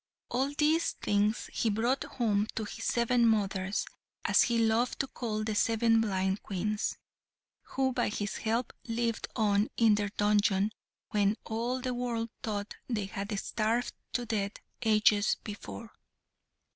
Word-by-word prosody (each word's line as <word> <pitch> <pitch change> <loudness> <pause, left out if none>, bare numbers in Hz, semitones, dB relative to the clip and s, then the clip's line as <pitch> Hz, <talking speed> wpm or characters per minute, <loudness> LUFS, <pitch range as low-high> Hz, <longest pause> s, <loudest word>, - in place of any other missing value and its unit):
All 265 +3 0
these 315 +2 +3
things 205 +2 0
he 225 - +1
brought 235 +6 +1
home 215 -4 0
to 220 - -1
his 220 +2 -6
seven 235 0 +2
mothers, 195 -3 +1 0.4
as - - +5
he 235 -1 +2
loved 230 +2 +2
to 275 - -3
call 215 -4 -3
the 215 0 -1
seven 225 +1 +3
blind 190 -2 0
Queens, 210 +2 -2 0.6
who 265 -1 -1
by - - +1
his 205 -1 -3
help 230 +2 -1
lived 230 0 -1
on 210 -1 +3
in 225 -2 +5
their 205 -1 0
dungeon 205 0 +2 0.4
when 205 0 +3
all 235 +3 -2
the 255 0 -2
world 235 -2 -2
thought 205 -2 -3 0.2
they 215 -5 -1
had 200 +1 -4
starved 230 +4 0 0.2
to 245 - -1
death 210 -3 -1 0.3
ages 215 -2 +4
before. 215 +2 -7
220 Hz, 145 wpm, -30 LUFS, 205-235 Hz, 0.6 s, as